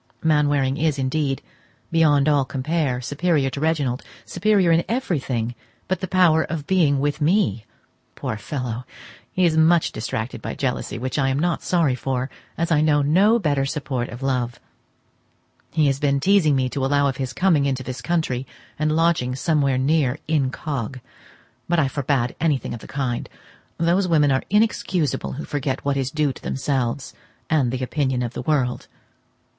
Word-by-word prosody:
Mainwaring 145 -3 +2
is 155 -3 +1
indeed, 135 +1 -1 0.5
beyond 150 -4 +4
all 145 -2 +4
compare, 135 -1 -1
superior 145 0 0
to 140 - -5
Reginald—superior 165 - 0
in 165 +1 +4
everything 135 - -1 0.3
but 185 - -1
the 185 - -3
power 175 -4 +4
of 155 -3 -4
being 155 -6 +3
with 145 +2 -1
me! 150 - +2 0.5
Poor - - -3
fellow! 125 +1 -4 0.5
he 185 - +2
is 165 -2 +2
much 160 +1 +4
distracted 110 +2 -4
by - - -5
jealousy, 130 -1 -2
which 130 +4 -3
I 135 -1 +2
am 135 - 0
not 170 +2 0
sorry 165 -7 +2
for, 130 +1 -2 0.3
as 170 +1 -1
I 150 -2 +4
know 150 -2 +3
no 195 +10 +4
better 145 -9 +1
support 135 -4 -3
of 120 +4 -8
love. 125 -3 -1 1.1
He 155 -2 +2
has 135 -1 +1
been 140 -1 +2
teazing 175 -3 +4
me 130 -1 +1
to 135 +1 -3
allow 145 +1 +2
of 135 -2 -2
his 130 -2 -3
coming 160 -6 +2
into 130 -1 -1
this 130 0 -6
country, 135 -3 -1 0.3
and 155 0 +1
lodging 160 -7 +2
somewhere 140 -2 +1
near 140 0 +2
incog.; 135 -4 -2 0.7
but 175 - +2
I 150 -4 +3
forbade 130 -3 -1
everything 150 -5 0
of 120 - -6
the - - -12
kind. 130 -4 -3 0.5
Those 175 +3 +2
women 150 -4 +3
are 130 - +2
inexcusable 190 - +1
who 145 - -6
forget 140 -2 -3
what 140 -1 +1
is 135 -2 -1
due 150 -1 0
to - - -14
themselves, 130 -1 -2 0.4
and 140 -6 +2
the 130 0 -3
opinion 130 -2 0
of 120 0 -4
the - - -4
world. 135 -6 0
145 Hz, 165 wpm, -22 LUFS, 130-160 Hz, 1.1 s, beyond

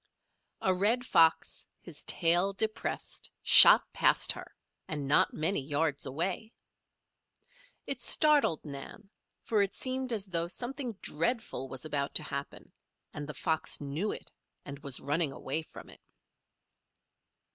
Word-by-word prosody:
A 190 - +2
red 220 +7 +1
fox, 165 -6 +2
his - - -11
tail 175 +4 +2
depressed, 215 +2 -3
shot - - +9
past - - +3
her, - - -9 0.4
and 150 -3 -4
not 145 - +3
many 160 +2 0
yards 145 +1 -2
away. 180 - -4 1.3
It - - -3
startled 295 - +2
Nan, 150 +8 -10 0.3
for 215 -2 +1
it 200 -1 -1
seemed 260 0 -2
as 210 -4 0
though 170 -3 -2
something 250 +5 -5
dreadful 165 - -2
was 130 +1 -8
about 145 -2 -3
to - - +4
happen 140 -1 -7 0.4
and 145 0 -7
the 150 - -7
fox 160 -2 -1
knew 150 +9 -3
it - - -9 0.3
and 140 -1 -8
was 140 -3 -2
running 150 +1 -1
away 135 +3 -3
from 155 - -13
it. - - -16
165 Hz, 135 wpm, -30 LUFS, 145-215 Hz, 1.3 s, shot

